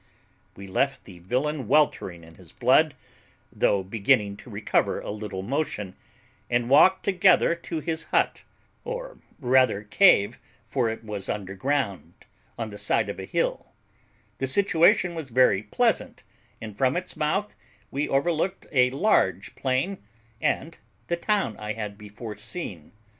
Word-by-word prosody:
"We 100 Hz, -, -10 dB
left 135 Hz, +9 st, -1 dB
the 90 Hz, -3 st, -13 dB
villain 130 Hz, -, -2 dB
weltering 95 Hz, -, +1 dB
in 80 Hz, 0 st, -15 dB
his -, -, -16 dB
blood, -, -, +3 dB, 0.6 s
though 100 Hz, -2 st, +2 dB
beginning 100 Hz, 0 st, +1 dB
to 125 Hz, -, -13 dB
recover 105 Hz, -1 st, 0 dB
a -, -, -6 dB
little 105 Hz, -3 st, -5 dB
motion, 105 Hz, -6 st, -3 dB, 0.5 s
and 120 Hz, +1 st, 0 dB
walked 185 Hz, +7 st, +6 dB
together 185 Hz, -2 st, +4 dB
to 170 Hz, -1 st, -5 dB
his 165 Hz, +1 st, -3 dB
hut, -, -, +1 dB, 0.4 s
or -, -, -6 dB, 0.2 s
rather 130 Hz, -, +3 dB
cave, 105 Hz, -, +4 dB, 0.3 s
for 125 Hz, -4 st, 0 dB
it 115 Hz, 0 st, -6 dB
was 105 Hz, -3 st, -5 dB
under 95 Hz, -2 st, -4 dB
ground, 100 Hz, -, -2 dB, 0.4 s
on 115 Hz, -2 st, -4 dB
the 105 Hz, -, -8 dB
side -, -, +1 dB
of -, -, -5 dB
a -, -, -5 dB
hill; -, -, -2 dB, 0.7 s
the 135 Hz, -, -1 dB
situation 180 Hz, +2 st, +3 dB
was 160 Hz, -5 st, -6 dB
very 120 Hz, -5 st, +4 dB
pleasant, 105 Hz, -, 0 dB, 0.4 s
and 110 Hz, -2 st, -8 dB
from 130 Hz, +7 st, +1 dB
its 180 Hz, 0 st, -4 dB
mouth 195 Hz, +8 st, -1 dB, 0.4 s
we 140 Hz, +2 st, -2 dB
overlooked 170 Hz, +6 st, 0 dB
a 125 Hz, -3 st, +4 dB
large 165 Hz, +12 st, +1 dB
plain 135 Hz, +9 st, -1 dB, 0.4 s
and 165 Hz, +1 st, -1 dB, 0.3 s
the 170 Hz, -, +2 dB
town 195 Hz, -, 0 dB
I 105 Hz, 0 st, -4 dB
had 105 Hz, -2 st, -5 dB
before 105 Hz, +1 st, -9 dB
seen. 95 Hz, -, -6 dB
130 Hz, 145 wpm, -25 LUFS, 105-165 Hz, 0.7 s, walked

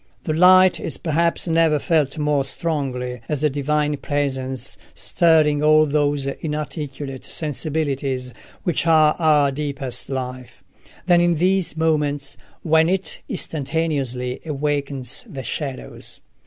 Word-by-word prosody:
The 155 Hz, -, -1 dB
light 185 Hz, +2 st, +6 dB
is -, -, -2 dB
perhaps 170 Hz, +2 st, 0 dB
never 165 Hz, -2 st, +3 dB
felt 150 Hz, -3 st, +1 dB
more 150 Hz, -2 st, +1 dB
strongly 135 Hz, -5 st, -2 dB
as 150 Hz, -1 st, -1 dB
a 150 Hz, -, +3 dB
divine 150 Hz, +1 st, 0 dB
presence 135 Hz, -2 st, -3 dB, 0.2 s
stirring 155 Hz, -3 st, +3 dB
all 155 Hz, 0 st, +5 dB
those 145 Hz, -1 st, 0 dB
inarticulate 145 Hz, -2 st, -5 dB
sensibilities 140 Hz, -4 st, -2 dB, 0.3 s
which 170 Hz, -2 st, 0 dB
are 155 Hz, -2 st, +5 dB
our 150 Hz, -4 st, +4 dB
deepest 140 Hz, -2 st, -4 dB
life, 130 Hz, -2 st, -6 dB, 0.4 s
than 175 Hz, -1 st, +5 dB
in 175 Hz, -1 st, +3 dB
these 185 Hz, 0 st, +1 dB
moments 145 Hz, -3 st, 0 dB, 0.3 s
when 160 Hz, 0 st, +4 dB
it 190 Hz, 0 st, -1 dB
instantaneously 140 Hz, -5 st, -2 dB
awakens 145 Hz, -3 st, -2 dB
the 135 Hz, -2 st, -6 dB
shadows. 135 Hz, -2 st, -5 dB
150 Hz, 115 wpm, -21 LUFS, 135-160 Hz, 0.4 s, light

